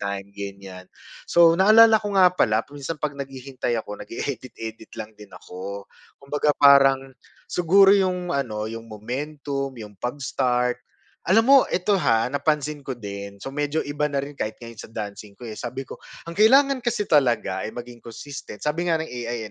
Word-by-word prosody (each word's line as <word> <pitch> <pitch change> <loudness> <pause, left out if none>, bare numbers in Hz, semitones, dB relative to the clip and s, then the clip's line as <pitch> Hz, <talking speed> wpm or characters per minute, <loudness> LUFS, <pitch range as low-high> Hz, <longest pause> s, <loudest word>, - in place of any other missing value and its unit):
time, 100 0 -5
ganyan, 100 -2 -9 0.4
so 170 -1 +6
naalala 220 +2 +7
ko 205 -1 -4
nga 185 -2 +7
pala, 110 -10 +2
minsan 145 +3 -5
pag 150 -1 -3
naghihintay 135 -2 -4
ako, 105 - -8
nag-e-edit-edit 115 -3 -6
lang 110 0 -6
din 105 - -11
ako. 100 +2 -8 0.4
Kumbaga 145 +1 0
parang 135 -1 +6 0.5
siguro 190 +3 +5
yung 185 -3 +1
ano, 115 -7 -2
yung 115 0 -8
momentum, 140 +5 -5
yung 105 -3 -9
pag-start. 125 -1 -1 0.5
Alam 220 +5 +5
mo, 280 - +9
ito 185 +3 0
ha, 115 -5 +2
napansin 150 +1 -1
ko 130 - -3
din, 100 -2 -7
so 135 - -5
medyo 145 +2 -1
iba 145 +1 -1
na 140 -1 -2
rin, 145 - -9
kahit 110 0 -3
ngayon 115 -1 -10
sa - - -11
dancing 105 -2 -7
ko, 125 - -12
eh. 110 - -6
Sabi 125 +2 -5
ko, - - -10 0.3
ang 170 - -8
kailangan 270 +5 +5
kasi 235 -3 -1
talaga 135 -6 +2
ay - - -10
maging 120 0 -9
consistent, 120 -1 -9
sabi 165 +4 -1
nga 165 - +3
ng 160 - -8
AI, 120 -3 -5
135 Hz, 170 wpm, -23 LUFS, 110-155 Hz, 0.5 s, mo